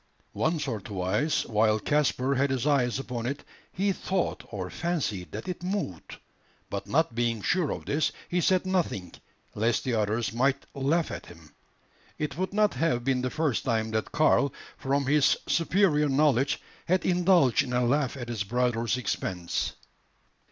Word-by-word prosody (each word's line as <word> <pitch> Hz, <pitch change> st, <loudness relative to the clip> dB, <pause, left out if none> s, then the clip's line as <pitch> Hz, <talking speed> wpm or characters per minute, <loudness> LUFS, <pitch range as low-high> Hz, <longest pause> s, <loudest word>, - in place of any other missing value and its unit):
Once 155 Hz, -2 st, 0 dB
or 115 Hz, -6 st, -3 dB
twice, 100 Hz, -, 0 dB
while 110 Hz, -1 st, +2 dB
Caspar 140 Hz, -1 st, +1 dB
had 140 Hz, +1 st, +2 dB
his 130 Hz, -1 st, -1 dB
eyes 130 Hz, -5 st, +2 dB
upon 125 Hz, -3 st, -4 dB
it, 140 Hz, +2 st, -4 dB, 0.3 s
he 195 Hz, +2 st, 0 dB
thought 190 Hz, -1 st, -2 dB
or 95 Hz, -4 st, -4 dB
fancied 135 Hz, -, -2 dB
that 110 Hz, -, -6 dB
it 180 Hz, -2 st, -4 dB
moved; 180 Hz, -, -4 dB, 0.5 s
but 100 Hz, -, -4 dB
not 160 Hz, -2 st, +1 dB
being 115 Hz, -1 st, 0 dB
sure 165 Hz, -, +1 dB
of -, -, -4 dB
this, 150 Hz, +2 st, +1 dB, 0.2 s
he 180 Hz, 0 st, 0 dB
said 185 Hz, +1 st, +2 dB
nothing, 165 Hz, -, -1 dB, 0.4 s
lest 115 Hz, +2 st, +1 dB
the 130 Hz, -, -1 dB
others 110 Hz, +1 st, 0 dB
might 135 Hz, +3 st, +1 dB
laugh 150 Hz, +5 st, 0 dB
at -, -, -7 dB
him. 80 Hz, -3 st, -15 dB, 0.6 s
It 150 Hz, -3 st, -3 dB
would 185 Hz, +3 st, -2 dB
not 210 Hz, +1 st, +2 dB
have 155 Hz, -8 st, 0 dB
been 130 Hz, -1 st, +1 dB
the 130 Hz, -, -1 dB
first 155 Hz, -3 st, 0 dB
time 110 Hz, -2 st, 0 dB
that 110 Hz, 0 st, -2 dB
Karl, 150 Hz, -2 st, +3 dB, 0.2 s
from 140 Hz, +1 st, 0 dB
his 145 Hz, +1 st, +4 dB
superior 165 Hz, -4 st, +3 dB
knowledge, 140 Hz, -1 st, +2 dB, 0.3 s
had 185 Hz, +2 st, +2 dB
indulged 175 Hz, -8 st, +4 dB
in 125 Hz, -, -5 dB
a 125 Hz, 0 st, +2 dB
laugh 140 Hz, +1 st, +1 dB
at 120 Hz, -2 st, -6 dB
his 115 Hz, -4 st, -2 dB
brother's 120 Hz, +1 st, 0 dB
expense. 90 Hz, -7 st, -2 dB
135 Hz, 165 wpm, -28 LUFS, 115-160 Hz, 0.6 s, his